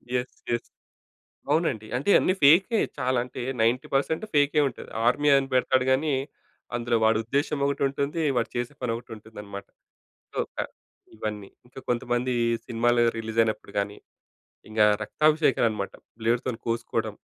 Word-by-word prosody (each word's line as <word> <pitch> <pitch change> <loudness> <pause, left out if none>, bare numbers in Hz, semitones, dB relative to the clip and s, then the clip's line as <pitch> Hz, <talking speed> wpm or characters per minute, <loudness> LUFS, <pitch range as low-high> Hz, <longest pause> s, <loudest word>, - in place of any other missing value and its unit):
Yes. 125 0 -2 0.2
Yes. 120 - -1 0.8
అవునండి. 150 -9 +1
అంటే 140 +9 -2
అన్నీ 185 - +2
ఫేకే 190 +10 +6 0.2
చాలా 130 -1 0
అంటే 125 - -7 0.2
90% 135 - +1
ఫేకే 145 +1 +3
ఉంటది. 120 - -11 0.2
ఆర్మీ 145 +5 +3
అని 135 0 0
పెడతాడు 130 0 +3
గాని 145 +4 +2 0.6
అందులో 120 0 +1
వాడి 110 0 +4
ఉద్దేశ్యం 140 +4 -1
ఒకటి 140 0 -1
ఉంటుంది, 140 +4 -2
వాడు 115 -2 0
చేసే 120 +3 -2
పని 125 -2 -1
ఒకటి 120 - -10
ఉంటుందన్నమాట. 105 -2 -10 0.7
సో, - - -6 0.2
క - - -15 0.6
ఇవన్నీ. 105 -2 -5 0.2
ఇంకా 125 +2 -11
కొంతమంది 120 +1 0 0.3
సినిమాలు 120 0 +2
రిలీజ్ 110 0 -5
అయినప్పుడు 110 -2 -3
గాని, 100 0 -2 0.7
ఇంకా 110 0 +4 0.2
రక్తాభిషేకలనమాట. 125 - +2 0.3
బ్లేడ్‌తొని 120 +1 0
కోసుకోవటం 115 -2 -2
120 Hz, 130 wpm, -26 LUFS, 110-140 Hz, 0.8 s, ఫేకే